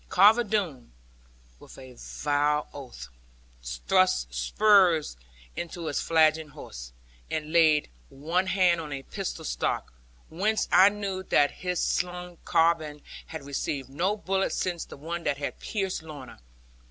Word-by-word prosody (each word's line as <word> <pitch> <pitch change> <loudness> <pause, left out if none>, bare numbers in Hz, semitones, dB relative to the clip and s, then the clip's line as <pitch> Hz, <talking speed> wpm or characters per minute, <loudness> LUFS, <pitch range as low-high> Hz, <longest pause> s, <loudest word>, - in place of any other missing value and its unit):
Carver 210 +6 +6
Doone, 185 - -2 0.7
with - - -14
a 130 -1 -11
vile 145 +3 -1
oath, 120 - -9 0.5
thrust - - +1
spurs 175 - +3 0.4
into 170 0 -5
his 145 - -1
flagging 160 -1 +3
horse, 60 - -10 0.4
and 155 0 -4
laid 155 -3 +4 0.2
one 170 +7 -1
hand 180 -3 +3
on 150 -2 -8
a 135 -1 -5
pistol 185 -4 -5
stock; - - -2 0.3
whence 210 +7 0
I 190 +2 +8
knew 200 -2 -4
that 145 -6 +3
his 180 -1 -3
slung 180 -1 -2
carbine 160 -3 +1 0.2
had 160 -3 -8
received 140 -1 -3
no 180 +10 0
bullet 195 -1 -1
since 175 -2 -2
the - - -11
one 170 +4 -5
that 140 - 0
had 145 - -5
pierced 195 -5 -3
Lorna. 150 -5 -10
160 Hz, 135 wpm, -27 LUFS, 145-185 Hz, 0.7 s, I